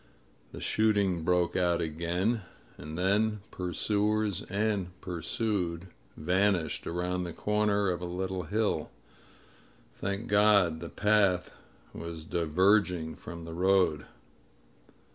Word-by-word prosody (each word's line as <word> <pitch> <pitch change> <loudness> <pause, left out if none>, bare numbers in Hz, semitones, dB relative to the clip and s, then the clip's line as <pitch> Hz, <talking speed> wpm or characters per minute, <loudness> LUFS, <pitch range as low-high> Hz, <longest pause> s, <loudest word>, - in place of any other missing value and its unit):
The - - -8
shooting 100 -6 +1
broke 90 0 +1
out 90 -2 +2
again 85 +7 -1 0.2
— - - -28
and 75 +2 -7
then 105 +3 +1
pursuers 105 +2 0
and 100 -3 -1
pursued 90 0 -2 0.3
vanished 90 0 +1
aroimd 90 +1 -2
the 85 - -6
comer 105 -1 +1
of 90 -1 -3
a - - -3
little 95 +1 -3
hill. 105 -7 0 1.0
Thank 100 +3 -3
God 100 -6 +4
the 85 0 -7
path 100 -4 +2 0.4
was 85 -1 -7
diverging 90 0 +2
from 85 -1 -9
the 80 - -7
road 90 -3 +2
90 Hz, 110 wpm, -29 LUFS, 85-105 Hz, 1.0 s, God